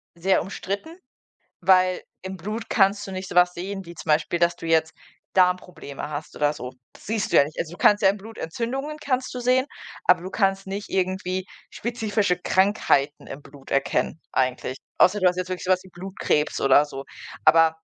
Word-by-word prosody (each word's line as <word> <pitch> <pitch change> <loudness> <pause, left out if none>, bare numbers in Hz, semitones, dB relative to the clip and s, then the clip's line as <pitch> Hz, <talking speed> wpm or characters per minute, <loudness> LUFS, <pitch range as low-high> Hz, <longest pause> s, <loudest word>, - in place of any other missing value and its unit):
sehr 185 +3 +2
umstritten, 200 - -5 0.6
weil 185 0 +4 0.2
im 190 0 -6
Blut 215 +6 -5
kannst 200 +1 +3
du - - -6
nicht 185 0 -5
so - - -7
was 180 0 +5
sehen, 195 +1 -5
wie 170 - -9
zum 155 0 -9
Beispiel, 160 +3 +2
dass 170 0 +3
du 165 - -9
jetzt 160 0 +2 0.4
Darmprobleme 180 -6 0
hast 150 0 -6
oder 145 0 +2
so. 125 -2 -7 0.2
Das - - -17
siehst 215 -1 -2
du - - +5
ja - - +8
nicht. 150 +2 -9
Also 170 0 -3
du - - -11
kannst 205 +5 +4
ja 190 - +7
im 200 - -1
Blut 220 +3 -12
Entzündungen 265 - -4
kannst 260 -3 -2
du 250 - -4
sehen, 255 +2 +2 0.4
aber 180 -1 +5
du 185 - -5
kannst 195 -2 0
nicht 200 +1 -5
irgendwie 185 0 -1 0.2
spezifische 215 -5 -1
Krankheiten 180 -7 +1
im 145 - -8
Blut 140 -1 -15
erkennen, 140 +3 0
eigentlich. 130 0 -1 0.2
Außer 205 +3 +5
du 185 - +4
hast 180 0 +1
jetzt 185 0 -3
wirklich 185 +1 -4
so 185 - +1
was 185 0 +2
wie 190 - -15
Blutkrebs 175 -4 -1
oder 140 +2 +5
so. 135 -2 -8 0.4
Aber 165 +1 +7
185 Hz, 200 wpm, -24 LUFS, 160-200 Hz, 0.6 s, ja